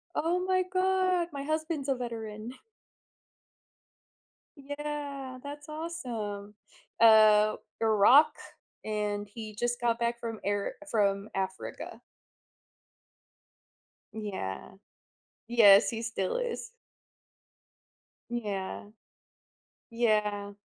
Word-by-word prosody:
Oh 340 +3 +1
my 370 0 +2
god! 370 -1 +1
My 275 - -4
husband's 310 -1 -2
a 270 - +2
veteran. 225 -2 -6 2.0
Yeah, 285 -2 -5
that's 290 +1 -8
awesome. 235 -11 -5 0.4
Uh, 215 -1 +7 0.3
Iraq, 225 +7 +6 0.5
and 210 -1 -2
he 215 0 -8
just 240 +2 -1
got 235 -1 +1
back 235 0 -1
from 230 -2 -5
air 205 0 -1 0.2
from 200 -1 +1
Africa. 190 0 -5 2.1
Yeah. 200 - -5 0.8
Yes, 210 -3 +7
he 225 -2 -4
still 225 -5 -2
is. 485 -2 -4 1.6
Yeah. 205 -5 -4 1.1
Yeah. 210 -3 0
235 Hz, 80 wpm, -29 LUFS, 210-290 Hz, 2.1 s, Uh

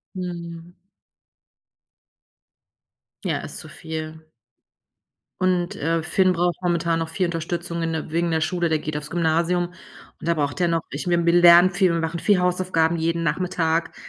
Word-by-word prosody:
Mhm. 170 -2 -7 2.5
Ja, - - -1
ist - - -8
zu - - -10
viel. 160 -1 -7 1.1
Und, 180 -1 +1
äh, 165 +2 -1
Finn 185 +3 +2
braucht 175 0 0
momentan 170 -1 +1
noch 165 0 -3
viel 180 +3 -1
Unterstützung 170 0 -3
in 165 0 -1
der 160 - -4
wegen 170 +1 0
der 160 0 +1
Schule, 170 +2 0
der 155 -1 +1
geht 150 0 -4
aufs 150 +1 -8
Gymnasium 170 +1 +1 0.5
und - - -8
da 170 - +3
braucht 145 +1 -2
er 175 - +2
noch 165 -1 +1
ich 145 - -5
bin 170 -1 +1
wir 170 - +5
lernen 175 +1 +8
viel, 185 -1 +2
und 170 - 0
machen 165 +1 -3
viel 200 +2 +3
Hausaufgaben 180 -2 +1
jeden 165 +1 -1
Nachmittag. 165 0 -1
170 Hz, 160 wpm, -23 LUFS, 160-175 Hz, 2.5 s, lernen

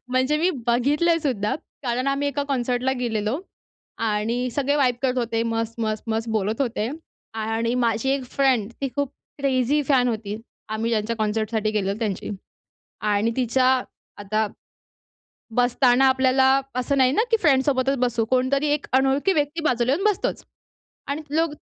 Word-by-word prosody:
म्हणजे 260 +4 +2
मी 345 +4 +2 0.2
बघितलंसुद्धा, 275 -2 +1 0.3
कारण 250 0 -1
आम्ही 275 +1 +1
एका 285 +1 -2
कॉन्सर्टला 250 0 0
गेलेलो 225 +3 -1 0.7
आणि 230 +4 -1
सगळे 285 0 +1
वाईब 260 -4 +3
करत 260 -1 +1
होते, 230 -1 0
मस्त! 230 0 -2
मस्त! 215 -1 -1
मस्त! 225 +1 -1
बोलत 220 +2 -1
होते. 230 -3 -1 0.4
आणि 225 +2 -1
माझी 230 +3 +1
1 270 -2 0
फ्रेंड, 255 -6 +2
ती 275 - -1
खूप 285 -2 0 0.3
क्रेझी 275 +1 +1
फॅन 260 -3 +3
होती, 215 -2 -3 0.3
आम्ही 220 +2 -2
ज्यांच्या 225 0 0
कॉन्सर्टसाठी 215 0 -1
गेलो 200 -2 -1
त्यांची. 210 -5 -3 0.7
आणि 210 +1 +1
तिच्या 255 +1 +2 0.6
आता 215 +2 0 1.1
बसताना, 245 +1 +4
आपल्याला 260 0 +4 0.2
असं 255 +3 0
नाही 260 -1 +4
ना, 435 +10 +2
की 455 - +5
फ्रेंड्ससोबतच 270 -2 +2
बसू, 240 -2 +1
कोणतरी 260 +3 +2
1 300 - -2
अनोळखी 270 +8 +3
व्यक्ती 295 +1 -1
बाजूला 245 0 +1
येऊन 355 +7 -1
बसतोच 420 -2 0 0.6
आणि 285 +3 -2
लोक 325 -1 +2
250 Hz, 145 wpm, -23 LUFS, 225-275 Hz, 1.1 s, की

